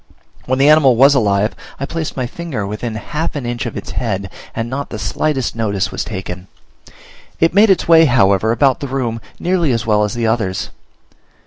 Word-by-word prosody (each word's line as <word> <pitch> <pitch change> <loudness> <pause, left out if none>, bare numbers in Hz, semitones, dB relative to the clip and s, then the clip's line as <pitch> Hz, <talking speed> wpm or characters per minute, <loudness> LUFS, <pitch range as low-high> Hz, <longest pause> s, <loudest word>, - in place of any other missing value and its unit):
When 130 +1 +1
the 135 +2 +4
animal 150 -5 +6
was 135 +4 +6
alive 105 -4 +1 0.2
I 140 - -2
placed 160 0 -5
my 130 - -1
finger 130 -5 -5
within 105 +3 -4
half 150 +10 -4
an 140 -4 -4
inch 120 -3 -3
of - - -6
its - - -7
head, 100 -5 -3 0.2
and 115 0 -2
not 140 +3 -4
the 110 - -6
slightest 130 +7 -1
notice 100 -4 -1
was 95 - -3
taken: 95 -3 -6 0.9
it 165 0 +3
made 205 +3 +5
its 190 - +2
way, 165 -1 +7
however, 110 -5 +3
about 130 +2 +2
the 140 - -4
room 120 -4 -3 0.2
nearly 175 -4 +1
as 115 -2 -1
well 105 -1 +2
as 105 +3 -2
the 120 -1 -1
others. 110 -5 -1
120 Hz, 195 wpm, -17 LUFS, 105-140 Hz, 0.9 s, way